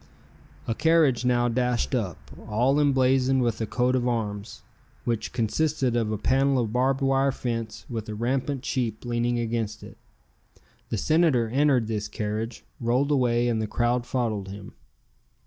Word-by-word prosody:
A 115 Hz, -, +1 dB
carriage 150 Hz, -4 st, +3 dB
now 120 Hz, -1 st, +3 dB
dashed 125 Hz, +1 st, 0 dB
up, 100 Hz, -, -1 dB, 0.3 s
all 125 Hz, +7 st, +2 dB
emblazoned 130 Hz, -2 st, +3 dB
with 115 Hz, -1 st, -1 dB
a 110 Hz, -, -1 dB
coat 125 Hz, +4 st, +1 dB
of 125 Hz, -1 st, 0 dB
arms, 105 Hz, -3 st, -3 dB, 0.4 s
which 115 Hz, -2 st, -2 dB
consisted 130 Hz, +2 st, 0 dB
of 115 Hz, -2 st, 0 dB
a 110 Hz, -, -1 dB
panel 135 Hz, +4 st, +2 dB
of 115 Hz, -3 st, -1 dB
barbed 130 Hz, +2 st, +1 dB
wire 135 Hz, 0 st, +2 dB
fence 115 Hz, -4 st, -4 dB
with 115 Hz, -3 st, -5 dB
a 105 Hz, -, -4 dB
rampant 130 Hz, +4 st, -1 dB
sheep 120 Hz, -5 st, -2 dB
leaning 120 Hz, 0 st, 0 dB
against 115 Hz, -2 st, -2 dB
it. -, -, -12 dB, 0.9 s
The 110 Hz, -, -1 dB
Senator 150 Hz, -, +2 dB
entered 135 Hz, -1 st, +3 dB
this 105 Hz, -2 st, -3 dB
carriage, 110 Hz, +2 st, -4 dB, 0.2 s
rolled 125 Hz, +5 st, +1 dB
away 120 Hz, -3 st, +2 dB
and 115 Hz, -2 st, 0 dB
the 110 Hz, -, -2 dB
crowd 120 Hz, +2 st, 0 dB
followed 110 Hz, -6 st, -1 dB
him. 100 Hz, 0 st, -9 dB
120 Hz, 155 wpm, -26 LUFS, 110-130 Hz, 0.9 s, carriage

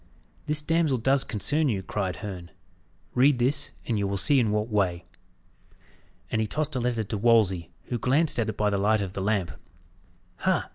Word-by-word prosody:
"This 150 Hz, 0 st, 0 dB
damsel 160 Hz, -4 st, +1 dB
does 135 Hz, +3 st, +2 dB
concern 145 Hz, +7 st, 0 dB
you," 100 Hz, -5 st, -1 dB
cried 95 Hz, -2 st, -3 dB
Herne. 90 Hz, -4 st, -7 dB, 0.6 s
"Read 130 Hz, +2 st, +4 dB
this, 140 Hz, +4 st, +1 dB, 0.2 s
and 115 Hz, -3 st, -1 dB
you 100 Hz, -, 0 dB
will 100 Hz, 0 st, -2 dB
see 140 Hz, +7 st, +4 dB
in 115 Hz, -4 st, +2 dB
what 105 Hz, +1 st, 0 dB
way." 95 Hz, -5 st, 0 dB, 1.3 s
And 110 Hz, -, +1 dB
he 110 Hz, -, -1 dB
tossed 150 Hz, +5 st, -2 dB
a -, -, 0 dB
letter 120 Hz, -2 st, -1 dB
to 105 Hz, +1 st, -4 dB
Wolsey, 105 Hz, -7 st, +3 dB
who 120 Hz, -, -4 dB
glanced 140 Hz, +5 st, +2 dB
at 115 Hz, -1 st, 0 dB
it -, -, -5 dB
by 105 Hz, -1 st, +1 dB
the 100 Hz, -, 0 dB
light 105 Hz, +1 st, +2 dB
of 95 Hz, -2 st, -4 dB
the 100 Hz, -, -4 dB
lamp. 100 Hz, -4 st, 0 dB, 0.9 s
"Ha! -, -, 0 dB
110 Hz, 190 wpm, -26 LUFS, 100-135 Hz, 1.3 s, Read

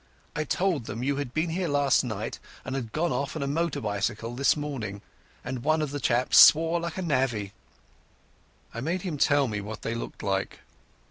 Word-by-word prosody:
I 150 Hz, -, -1 dB
told 175 Hz, -7 st, 0 dB
them 115 Hz, +4 st, -4 dB
you 140 Hz, +1 st, 0 dB
had 140 Hz, -4 st, -3 dB
been 160 Hz, +4 st, -1 dB
here 180 Hz, +1 st, -1 dB
last 145 Hz, -3 st, +3 dB
night 110 Hz, -3 st, -4 dB, 0.3 s
and 130 Hz, -, -4 dB
had 125 Hz, -5 st, -4 dB
gone 165 Hz, +4 st, 0 dB
off 140 Hz, +5 st, -2 dB
on 155 Hz, -, -2 dB
a -, -, -2 dB
motor 165 Hz, +2 st, -1 dB
bicycle 105 Hz, +2 st, -2 dB
this 140 Hz, +4 st, +2 dB
morning, 115 Hz, -9 st, -5 dB, 0.4 s
and 125 Hz, -1 st, -4 dB
one 155 Hz, 0 st, +2 dB
of 150 Hz, -3 st, -2 dB
the 145 Hz, -, -3 dB
chaps 125 Hz, -1 st, +3 dB
swore 165 Hz, +2 st, +7 dB
like 170 Hz, +1 st, -5 dB
a 190 Hz, -, -2 dB
navvy." 130 Hz, -, 0 dB, 1.2 s
I 115 Hz, -, -5 dB
made 170 Hz, +6 st, -2 dB
him 165 Hz, -7 st, -4 dB
tell 145 Hz, -1 st, +4 dB
me 105 Hz, -3 st, -3 dB
what 105 Hz, +2 st, -7 dB
they 115 Hz, -, -2 dB
looked 115 Hz, -, -6 dB
like. 95 Hz, -1 st, -2 dB
140 Hz, 200 wpm, -27 LUFS, 115-155 Hz, 1.2 s, swore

